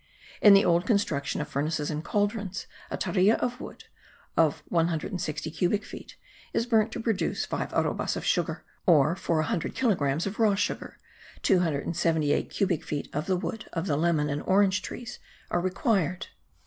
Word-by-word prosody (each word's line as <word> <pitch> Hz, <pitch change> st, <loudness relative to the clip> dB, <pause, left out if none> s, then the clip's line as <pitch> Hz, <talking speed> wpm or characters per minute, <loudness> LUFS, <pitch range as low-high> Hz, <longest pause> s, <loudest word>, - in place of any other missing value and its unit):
In 205 Hz, -2 st, +9 dB
the 195 Hz, -, +5 dB
old 170 Hz, +2 st, +2 dB
construction 155 Hz, -, 0 dB
of 150 Hz, -, -4 dB
furnaces 150 Hz, +2 st, -1 dB
and 155 Hz, +1 st, -3 dB
cauldrons, 205 Hz, 0 st, -1 dB, 0.2 s
a -, -, -3 dB
tarea 200 Hz, +3 st, +3 dB
of 245 Hz, +1 st, -3 dB
wood, -, -, -9 dB, 0.5 s
of 160 Hz, -3 st, +2 dB
one 165 Hz, -1 st, +2 dB
hundred 165 Hz, +2 st, -3 dB
and 180 Hz, -4 st, -3 dB
sixty 155 Hz, +1 st, -3 dB
cubic 185 Hz, +5 st, 0 dB
feet, -, -, -10 dB, 0.4 s
is 230 Hz, -, +1 dB
burnt 225 Hz, -2 st, +2 dB
to -, -, -4 dB
produce 225 Hz, -4 st, -1 dB
five -, -, -3 dB
arrobas -, -, 0 dB
of -, -, -5 dB
sugar, -, -, 0 dB, 0.2 s
or, 155 Hz, -1 st, +5 dB
for 165 Hz, -3 st, 0 dB
a -, -, -1 dB
hundred 165 Hz, -, -2 dB
kilogrammes 165 Hz, -, +1 dB
of 200 Hz, +3 st, -5 dB
raw 215 Hz, -3 st, +4 dB
sugar, 200 Hz, -, -3 dB, 0.5 s
278 160 Hz, -3 st, +1 dB
cubic 185 Hz, -5 st, 0 dB
feet 145 Hz, -1 st, -4 dB
of 150 Hz, +6 st, -2 dB
the 185 Hz, -1 st, +2 dB
wood 215 Hz, +4 st, -5 dB
of 165 Hz, 0 st, -2 dB
the 150 Hz, -, 0 dB
lemon 155 Hz, -1 st, +2 dB
and 145 Hz, 0 st, -2 dB
orange 190 Hz, 0 st, +3 dB
trees 245 Hz, +4 st, -7 dB, 0.3 s
are 175 Hz, -, +1 dB
required. 185 Hz, -1 st, 0 dB
175 Hz, 175 wpm, -27 LUFS, 155-205 Hz, 0.5 s, In